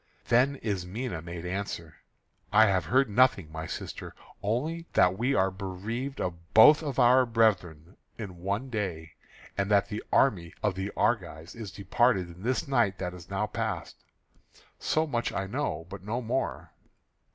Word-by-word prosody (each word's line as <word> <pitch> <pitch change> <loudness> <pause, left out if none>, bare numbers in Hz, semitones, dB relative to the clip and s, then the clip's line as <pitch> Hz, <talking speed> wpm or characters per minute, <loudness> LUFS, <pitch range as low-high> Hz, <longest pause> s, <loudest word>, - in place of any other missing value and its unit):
Then 130 +4 +4
Ismené 100 -1 -3
made 85 0 -7
answer: 90 -3 -5 0.5
"I 110 - +7
have 95 -5 +1
heard 130 +9 +3
nothing 105 -7 +3
my 80 +1 -5
sister, - - -7 0.3
only 155 - -2
that 90 +1 +4
we 125 +7 0
are 95 -3 +2
bereaved 100 +8 -5
of 85 -2 -5
both 150 +8 +9
of 145 -5 -4
our 125 0 +6
brethren 100 -8 0 0.2
in 100 -6 -7
one 100 +8 -3
day, 90 -7 -3 0.4
and 100 0 -1
that 100 -1 +3
the 105 0 -4
army 90 -11 +2
of 105 - +2
the 95 +2 -4
Argives 85 -7 -1
is 110 -3 -7
departed 95 -2 +1
in 90 - -14
this 125 +6 -1
night 120 -8 +2
that 90 -1 -4
is 90 -1 -12
now 100 +2 -1
past. 105 - -4 0.8
So 155 +1 +1
much 120 -6 -1
I 95 - -2
know, 95 - -3
but 100 +1 -9
no 110 +5 -3
more." 125 +2 -3
100 Hz, 160 wpm, -28 LUFS, 90-120 Hz, 0.8 s, both